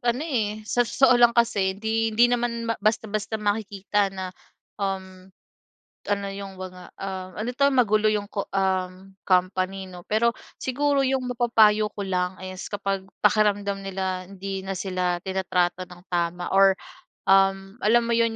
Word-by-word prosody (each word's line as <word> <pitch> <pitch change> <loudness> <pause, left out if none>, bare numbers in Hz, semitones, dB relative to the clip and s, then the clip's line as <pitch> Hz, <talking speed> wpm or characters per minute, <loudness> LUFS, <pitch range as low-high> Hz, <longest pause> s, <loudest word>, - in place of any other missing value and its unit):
ano, 240 +3 0
eh, 215 -8 -2
sa 245 - 0
totoo 255 +2 +4
lang 240 0 +5
kasi 200 -5 +2
hindi 225 +2 0
hindi 225 +2 +4
naman 235 -1 -1 0.2
basta-basta 215 0 0
makikita 205 -1 0
na, 190 -1 -6 0.5
um, 190 -1 -4 0.8
ano 200 -1 0
'yong 195 -1 -7
mga, 185 -1 -8 0.2
um, 190 -1 -5
ano 215 +3 -3
ito 280 +3 +1
magulo 215 -4 +3
'yong, 205 -1 -2
um, 190 -1 -2 0.2
company 185 +1 +1
no 180 -1 -11
pero 230 +2 +3 0.3
siguro 280 +1 +1
'yong 265 -1 0
mapapayo 215 -3 +4
ko 205 - -5
lang 180 -1 -1
is 185 -1 -7
kapag 195 -1 -2 0.2
pakiramdam 205 -2 +2
nila 190 -1 -3
hindi 195 0 -5
na 195 - -3
sila 185 -1 -1
tinatrato 185 -1 0
ng 180 0 -13
tama 175 0 -1
or, 195 0 +5 0.5
um, 195 +2 +3
alam 235 +3 +4
mo - - -1
'yon 230 -1 +2
195 Hz, 145 wpm, -25 LUFS, 190-220 Hz, 0.8 s, lang